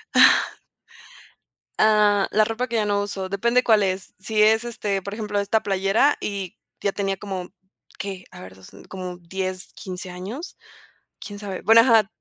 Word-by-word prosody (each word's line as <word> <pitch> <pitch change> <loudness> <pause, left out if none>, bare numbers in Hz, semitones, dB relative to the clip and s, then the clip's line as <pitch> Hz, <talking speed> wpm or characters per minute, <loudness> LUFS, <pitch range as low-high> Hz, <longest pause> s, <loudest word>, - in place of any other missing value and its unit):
Ah. - - +6 1.3
Ah, 210 -2 +4
la 215 - +4
ropa 225 +3 -2
que 235 - -4
ya 215 -2 +1
no 205 -1 +1
uso, 195 -2 -4
depende 235 +6 +2
cuál 215 -3 +4
es. 190 0 -3
Si 210 +2 0
es, 220 +2 +5
este, 205 -4 -2
por 200 +2 -7
ejemplo, 210 -1 -2
esta 205 +2 +1
playera, 195 +8 +2
y 195 -3 -5 0.2
ya 200 - +1
tenía 195 -1 -2
como, 190 -2 -6 0.5
¿qué?, 190 -2 -6
a - - -12
ver, 95 0 -11
2, 95 0 -16
mm, - - -14
como 185 -1 -7
10, 185 +1 -5
15 185 -1 -7
años, 200 - -7 0.6
quién 205 -1 -8
sabe. 200 -3 -6
Bueno, 225 +3 +7
ajá 225 -4 +4
200 Hz, 170 wpm, -23 LUFS, 190-215 Hz, 1.3 s, Bueno